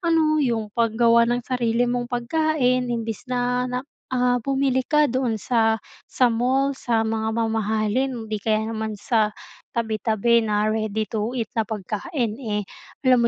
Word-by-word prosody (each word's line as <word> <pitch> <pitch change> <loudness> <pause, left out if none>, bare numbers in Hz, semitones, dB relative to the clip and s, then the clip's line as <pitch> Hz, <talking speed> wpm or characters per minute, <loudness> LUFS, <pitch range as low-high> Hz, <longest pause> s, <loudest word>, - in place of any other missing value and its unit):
ano 330 -3 +3 0.2
'yong 225 -6 -1
paggawa 235 0 +3
ng 240 0 0
sarili 245 -2 +1
mong 245 0 -1
pagkain 255 0 +1
imbis 230 0 -4
na 250 0 0
nak 250 +2 -3 0.2
ah, 250 -1 +1
bumili 270 +1 +1
ka 300 0 +4
doon 255 -4 0
sa, 225 +1 +2 0.3
sa 250 -2 +2
mall, 265 +4 +1
sa 235 -4 0
mga 220 0 -1
mamahalin. 220 +2 0
'Di 215 -1 -4
kaya 215 +1 +1
naman 220 -1 -3
sa 215 +1 +1 0.5
tabi-tabi 225 0 +2
na 210 0 +1
ready-to-eat 220 +2 -2
na 225 - +1
pagkain, 215 - -3
eh. 210 -4 -2 0.4
Alam 255 -1 +5
235 Hz, 140 wpm, -23 LUFS, 220-250 Hz, 0.5 s, Alam